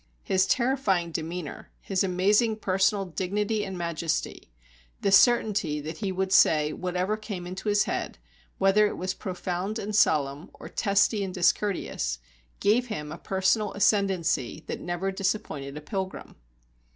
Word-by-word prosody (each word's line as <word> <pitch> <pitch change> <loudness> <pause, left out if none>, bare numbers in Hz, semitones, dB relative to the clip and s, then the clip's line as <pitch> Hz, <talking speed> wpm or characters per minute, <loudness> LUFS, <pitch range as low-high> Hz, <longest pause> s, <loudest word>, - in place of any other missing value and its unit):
His 190 -1 +2
terrifying 235 -10 +1
demeanour, 165 0 -5
his 195 -1 -1
amazing 205 +5 +2
personal 195 -1 +1
dignity 205 +4 -1
and 190 -2 -5
majesty, 170 - -3 0.5
the 200 - +1
certainty 195 - +4
that 155 +3 -6
he 200 -3 -2
would 190 0 -2
say 150 -4 +5
whatever 180 +3 -1
came 210 -4 -6
into 185 +4 -4
his 205 0 +4
head, - - -3 0.4
whether 195 +2 +4
it - - -5
was 185 +1 -2
profound 185 +2 -4
and 210 -1 -4
solemn, 145 -4 +2
or - - -10
testy 200 +1 +2
and 185 -2 -5
discourteous, 175 - 0 0.4
gave 235 +5 +2
him 150 -10 -5
a 160 - -6
personal 195 +2 +1
ascendancy 195 - +1
that - - -5
never 175 +2 -2
disappointed 185 -8 -3
a - - -6
pilgrim. 190 +5 -5
190 Hz, 140 wpm, -27 LUFS, 175-205 Hz, 0.5 s, say